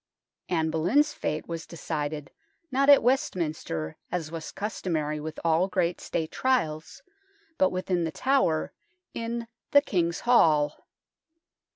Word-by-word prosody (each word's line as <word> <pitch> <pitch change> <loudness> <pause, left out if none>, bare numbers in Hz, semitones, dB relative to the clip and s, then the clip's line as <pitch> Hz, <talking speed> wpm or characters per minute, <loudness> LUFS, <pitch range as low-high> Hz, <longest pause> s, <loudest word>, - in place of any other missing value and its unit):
Anne 160 -3 +1
Boleyn's 235 - +2
fate 155 +1 -3
was 165 -1 -5
decided, 150 -3 -4 0.4
not 275 +2 +3
at 285 -4 +8
Westminster, 155 - -1
as 165 -3 -3
was 165 -2 -6
customary 160 -7 -2
with 155 +1 -6
all 165 +2 +3
great 180 -2 0
State 160 -1 -3
trials, 160 -13 -1 0.6
but 280 - +5
within 185 -1 -1
The 160 - -2
Tower, 255 - +1 0.4
in 230 0 -4
" - - -58
the 285 - +8
King's 170 - 0
Hall." 155 -11 +3
170 Hz, 130 wpm, -27 LUFS, 155-230 Hz, 0.6 s, at